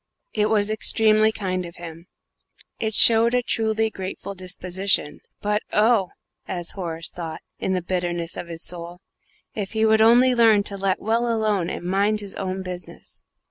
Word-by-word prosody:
It 210 -1 +1
was 210 -1 +1
extremely 215 0 +4
kind 185 -4 -3
of 170 -1 -10
him; 170 0 -10 0.7
it 220 -1 -2
showed 230 +1 +6
a 250 - +1
truly 220 -1 0
grateful 190 +1 -6
disposition 185 -3 -2 0.2
"but, 210 0 0
oh!" 210 -3 +3 0.4
as 175 -2 -2
Horace 165 -3 -5
thought, 165 -2 -7 0.2
in 190 - -1
the 180 -2 -1
bitterness 175 -2 -3
of 175 - -6
his 165 0 -7
soul, 175 0 -4 0.5
"if 205 -1 -5
he 220 0 +2
would 220 0 +4
only 245 +3 +6
learn 225 -4 +5
to 200 - -3
let 195 -1 -1
well 235 +2 0
alone 210 -6 0
and 175 - -6
mind 200 +3 +1
his 200 -1 -7
own 190 0 -4
business!" 180 -1 -8
195 Hz, 165 wpm, -23 LUFS, 180-220 Hz, 0.7 s, showed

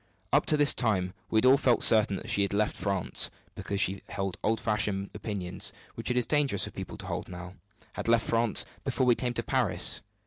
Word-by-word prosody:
Up - - +3
to 150 - +4
this 145 -1 +5
time 95 -6 0 0.2
we 110 - 0
had 110 - +3
all 135 +2 +6
felt 125 -4 +2
certain 105 -3 +5
that 115 - -7
she 100 - +2
had 100 0 -1
left 105 +1 0
France, 100 -3 0 0.2
because 100 - -4
she 95 0 +1
held 95 -2 -3
old 110 0 +1
fashioned 105 -3 -1
opinions 100 -4 -4 0.2
which - - -5
it 125 - 0
is 125 - +3
dangerous 145 -9 +1
for - - -3
people - - -8
to - - -8
hold - - -4
now 90 0 -9 0.4
had - - -6
left 115 0 +3
France 115 -1 +3 0.2
before 130 - 0
we 125 - +5
came 120 0 -3
to 115 - -2
Paris. 115 -11 0
105 Hz, 215 wpm, -28 LUFS, 95-120 Hz, 0.4 s, all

